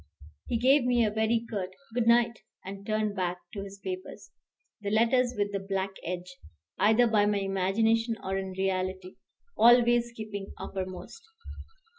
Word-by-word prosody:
He 235 - 0
gave 265 +4 +4
me 240 -2 +3
a 210 - 0
very 220 +2 +1
curt 195 -5 -3 0.2
"good 240 -1 0
night," 235 -1 +4 0.3
and 195 +1 -8
turned 215 -1 0
back 180 -2 -1 0.2
to 200 - -5
his 200 0 -9
papers, 370 - -7 0.5
the 200 - -3
letters 240 +3 +2
with 205 0 0
the 200 - -2
black 195 0 -2
edge, 180 +1 -6 0.4
either 220 +3 +5
by 215 -3 +3
my 205 0 +1
imagination 220 +4 +1
or 190 0 -2
in 190 -1 -3
reality, 185 -1 -2 0.4
always 240 0 +5
keeping 210 -3 -7
uppermost. 185 - -6
210 Hz, 150 wpm, -28 LUFS, 195-235 Hz, 0.5 s, either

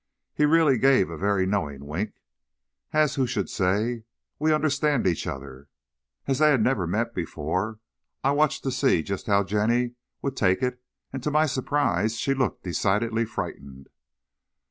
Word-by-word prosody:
He 150 - +2
really 155 -5 +4
gave 135 -10 +4
a - - -5
very 100 +1 +1
knowing 75 -8 -2
wink, 90 +9 -4 0.8
as 155 -3 +3
who 130 -2 0
should 110 -6 -2
say: 110 +5 0 0.4
"We 155 +1 +2
understand 150 -3 +1
each 85 -4 0
other." 70 0 -7 0.6
As 135 -1 0
they 155 0 +6
had 130 -7 +3
never 110 -9 +1
met 85 - -1
before, 95 +9 -3 0.5
I 135 - +3
watched 150 +1 +1
to 135 - -1
see 130 - +2
just 100 +3 -5
how 100 -1 +3
Jenny 115 +5 +1 0.3
would 135 -1 -2
take 95 +1 +2
it, 125 0 -1 0.3
and 135 - -4
to 150 - -1
my 155 +1 +3
surprise 130 -5 0
she 135 - 0
looked 130 -5 -1
decidedly 110 +5 0
frightened. 70 -10 -7
115 Hz, 160 wpm, -25 LUFS, 95-135 Hz, 0.8 s, they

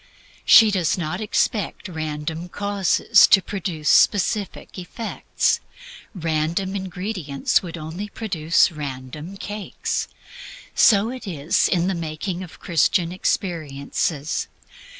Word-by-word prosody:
She 220 -1 +8
does 180 -5 +1
not 170 +2 -3
expect 210 0 -1
random 160 0 -5
causes 205 +2 +3
to 195 - +7
produce 180 -6 -5
specific 205 -1 +2
effects 220 +5 -1 0.6
random 165 +3 -1
ingredients 185 -6 -1
would 170 -2 -7
only 170 +6 -6
produce 170 -9 +1
random 150 +4 -7
cakes. 205 +1 -4 0.7
So 215 +1 +4
it 255 -4 -8
is 160 -3 +1
in 175 -2 +1
the 190 - 0
making 170 +2 -4
of 180 -3 -10
Christian 170 +1 +1
experiences. 155 -4 -2
175 Hz, 105 wpm, -22 LUFS, 155-200 Hz, 0.7 s, She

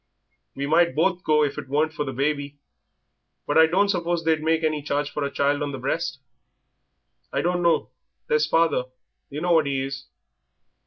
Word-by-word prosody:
We 140 - -3
might 170 +3 +3
both 180 +3 +1
go 150 -1 +3
if 140 -1 -2
it - - -9
weren't 155 +3 +1
for 150 - -3
the 135 - -4
baby, 145 +2 -2 0.9
but 145 - -1
I 160 0 +7
don't 190 +5 +2
suppose 175 -3 -1
they'd 160 -1 +1
make 160 +1 +1
any 155 -1 0
charge 145 0 -2
for 150 - -3
a 140 - -1
child 140 +1 0
on 145 -1 -3
the - - -4
breast." 135 +5 -2 1.1
"I - - -1
dunno. 175 -5 +1 0.3
There's 150 0 +1
father; 165 -5 +2 0.4
yer 145 +2 -6
know 175 +1 0
what 160 -4 +4
he 135 -1 -1
is." 135 -1 -6
150 Hz, 180 wpm, -24 LUFS, 140-165 Hz, 1.1 s, I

